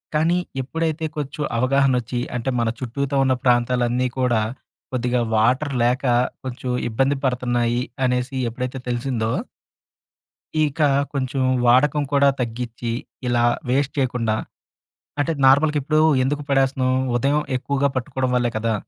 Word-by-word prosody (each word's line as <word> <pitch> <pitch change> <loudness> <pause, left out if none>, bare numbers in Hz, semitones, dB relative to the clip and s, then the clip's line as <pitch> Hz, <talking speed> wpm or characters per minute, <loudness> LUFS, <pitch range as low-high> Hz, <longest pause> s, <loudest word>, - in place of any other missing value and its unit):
కానీ, 165 +3 +3 0.2
ఎప్పుడైతే 160 +3 -2
కొంచెం 150 +1 -4 0.2
అవగాహనొచ్చి, 130 -2 +1 0.2
అంటే 125 +2 -2
మన 115 -1 +1
చుట్టూతా 140 +3 -3
ఉన్న 130 -1 +3
ప్రాంతాలన్నీ 125 0 +2
కూడా, 120 -4 +2 0.5
కొద్దిగా 125 0 0
వాటర్ 130 +6 +2
లేక, 125 +3 +1 0.4
కొంచెం 130 0 -5 0.2
ఇబ్బంది 135 +5 +1
పడతన్నాయి, 120 -1 0 0.2
అనేసి 125 +2 -1
ఎప్పుడైతే 125 +2 -4
తెలిసిందో... 120 -2 -1 1.3
ఇక 150 +2 -3 0.3
కొంచెం 135 0 -1 0.2
వాడకం 140 +4 +4
కూడా 140 0 +5
తగ్గిచ్చి, 120 0 -3 0.4
ఇలా 120 -1 +2 0.3
వేస్ట్ 140 +2 +1
చేయకుండా 125 -5 0 0.8
అంటే, 145 +3 +1
నార్మల్‌గిప్పుడు 150 +2 +3 0.2
ఎందుకు 145 +2 -1
పడేస్తున్నాం? 135 -1 +2 0.2
ఉదయం 140 +5 +2 0.2
ఎక్కువగా 140 +1 0
పట్టుకోవడం 130 0 -2
వల్లే 120 -1 +2
కదా! 115 0 0
130 Hz, 115 wpm, -22 LUFS, 120-140 Hz, 1.3 s, కూడా